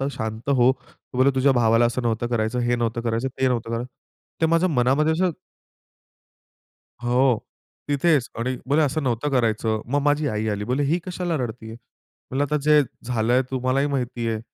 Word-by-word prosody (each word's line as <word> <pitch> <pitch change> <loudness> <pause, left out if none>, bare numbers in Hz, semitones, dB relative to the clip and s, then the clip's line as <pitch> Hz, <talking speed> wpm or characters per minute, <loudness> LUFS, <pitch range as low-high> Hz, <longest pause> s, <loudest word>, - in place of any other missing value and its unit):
तर 135 - 0
शांत 110 0 -5
हो. 130 -2 +4
तो 130 -1 -16
बोलला, 130 +2 +5
तुझ्या 135 +1 +3
भावाला 115 -1 +3
असं 120 +2 -2
नव्हतं 115 0 -1
करायचं, 115 0 -1
हे 120 0 +1
नव्हतं 115 0 -1
करायचं, 115 +2 -1
ते 130 - +4
नव्हतं 115 -2 -2
करायचं. 120 +2 -3 0.5
ते 160 - +4
माझ्या 165 +3 +2
मनामध्ये 140 +2 +2
असं 180 +3 +1 1.7
हो. 125 0 +2 0.4
तिथेच 145 -2 +2
आणि 125 +2 -1
बोलली 145 +3 +3
असं 150 +2 0
नव्हतं 125 +2 -1
करायचं. 110 -4 +1
मग 140 +4 0
माझी 145 +1 +2
आई 105 -1 -2
आली, 105 0 -2
बोलली 125 +6 0
ही 165 +5 +1
कशाला 180 -2 -2
रडतीये? 110 -3 -5
म्हणलं 130 +3 -8
आता 150 +1 -1
जे 150 0 +5 0.2
झालंय 120 +1 +1
तुम्हालाही 130 +2 0
माहिती 125 -4 -2
आहे. 110 -1 -2
125 Hz, 175 wpm, -23 LUFS, 115-140 Hz, 1.7 s, बोलला